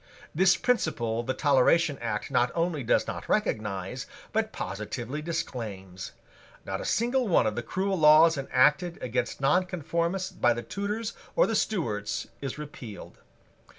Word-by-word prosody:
This 185 +3 +4
principle 120 - 0
the 130 +2 -3
Toleration 145 +2 +3
Act 105 -3 -3
not 125 +1 +2
only 165 -4 0
does - - +2
not - - -6
recognise, 100 -3 -1 0.3
but - - 0
positively 115 +8 -5
disclaims. 100 - -5 0.5
Not 95 0 -3
a - - -6
single 245 +2 +1
one 170 - +4
of 110 -1 0
the 120 - -2
cruel 190 +9 -1
laws 155 +2 +7
enacted 150 +6 +2
against 125 0 -2
nonconformists 180 +3 0
by 120 -1 +2
the 120 - -4
Tudors 210 +3 -3 0.2
or - - +5
the - - -1
Stuarts 110 - -1 0.2
is 135 0 -4
repealed. 140 -8 -9
145 Hz, 140 wpm, -28 LUFS, 115-175 Hz, 0.5 s, laws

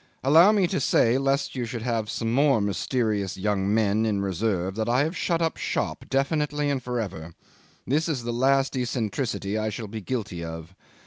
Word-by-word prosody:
Allow 160 +9 +7
me 205 -3 +3
to 170 - -1
say, 125 -1 +3
lest 135 +1 0
you 125 -2 -2
should 115 -1 -5
have 115 -3 -1
some 115 0 -2
more 140 -1 +4
mysterious 105 -1 -1
young 100 0 0
men 110 0 +2
in 105 -3 0
reserve, 95 -1 -1
that 110 +2 -2
I 125 +3 +3
have 160 +4 -2
shut 170 -1 0
up 165 - -1
shop, - - -2
definitely 145 +1 0
and 135 -2 -1
for 125 -1 -3
ever. 85 -6 -6 0.5
This 155 +6 0
is 135 -7 -2
the 120 0 -3
last 135 +3 +2
eccentricity 115 -3 -2
I 110 0 -1
shall 110 +2 -5
be 110 +2 -6
guilty 105 -6 -4
of. 80 +1 -7
115 Hz, 190 wpm, -25 LUFS, 105-135 Hz, 0.5 s, Allow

